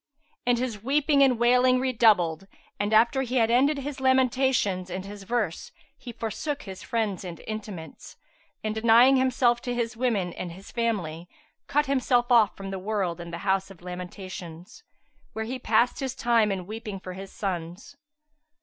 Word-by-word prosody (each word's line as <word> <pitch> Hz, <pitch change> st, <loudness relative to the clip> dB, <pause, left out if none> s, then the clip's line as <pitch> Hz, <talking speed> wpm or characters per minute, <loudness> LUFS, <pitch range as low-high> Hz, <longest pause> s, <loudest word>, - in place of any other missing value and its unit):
And 245 Hz, -1 st, +4 dB
his 235 Hz, -4 st, -3 dB
weeping 280 Hz, +3 st, +2 dB
and 260 Hz, -3 st, +5 dB
wailing 250 Hz, +2 st, +4 dB
redoubled; 210 Hz, -9 st, +2 dB, 0.3 s
and, 205 Hz, +1 st, -1 dB
after 235 Hz, +5 st, +4 dB
he 255 Hz, -1 st, -3 dB
had 230 Hz, -2 st, +3 dB
ended 275 Hz, +5 st, +3 dB
his 275 Hz, 0 st, -5 dB
lamentations 260 Hz, -7 st, +2 dB
and 185 Hz, +1 st, -5 dB
his 205 Hz, 0 st, -9 dB
verse, 210 Hz, -4 st, -2 dB, 0.2 s
he 260 Hz, -3 st, -9 dB
forsook 240 Hz, +6 st, -4 dB
his 190 Hz, -2 st, -9 dB
friends 215 Hz, -5 st, -2 dB
and 175 Hz, -2 st, -7 dB
intimates, 205 Hz, -7 st, -8 dB, 0.5 s
and 215 Hz, 0 st, -1 dB
denying 235 Hz, +4 st, +5 dB
himself 250 Hz, -2 st, +2 dB
to 245 Hz, -1 st, -3 dB
his 235 Hz, -1 st, -2 dB
women 220 Hz, -8 st, 0 dB
and 175 Hz, -2 st, -6 dB
his 190 Hz, +3 st, -13 dB
family, 180 Hz, -8 st, -2 dB, 0.4 s
cut 295 Hz, +1 st, +2 dB
himself 255 Hz, -3 st, +1 dB
off 225 Hz, -4 st, +5 dB
from 195 Hz, 0 st, -6 dB
the 190 Hz, -, -4 dB
world 185 Hz, -4 st, -2 dB
in 170 Hz, -, -8 dB
the 170 Hz, -, -5 dB
House 195 Hz, 0 st, +1 dB
of 185 Hz, -3 st, -15 dB
Lamentations, 180 Hz, -1 st, -8 dB, 0.5 s
where 220 Hz, 0 st, -3 dB
he 255 Hz, +3 st, -4 dB
passed 235 Hz, +1 st, +2 dB
his 265 Hz, -2 st, -3 dB
time 230 Hz, -4 st, +2 dB
in 185 Hz, -2 st, -3 dB
weeping 215 Hz, -1 st, -6 dB
for 185 Hz, -1 st, -8 dB
his 195 Hz, +1 st, -9 dB
sons. 180 Hz, +5 st, -5 dB
220 Hz, 170 wpm, -26 LUFS, 190-250 Hz, 0.5 s, and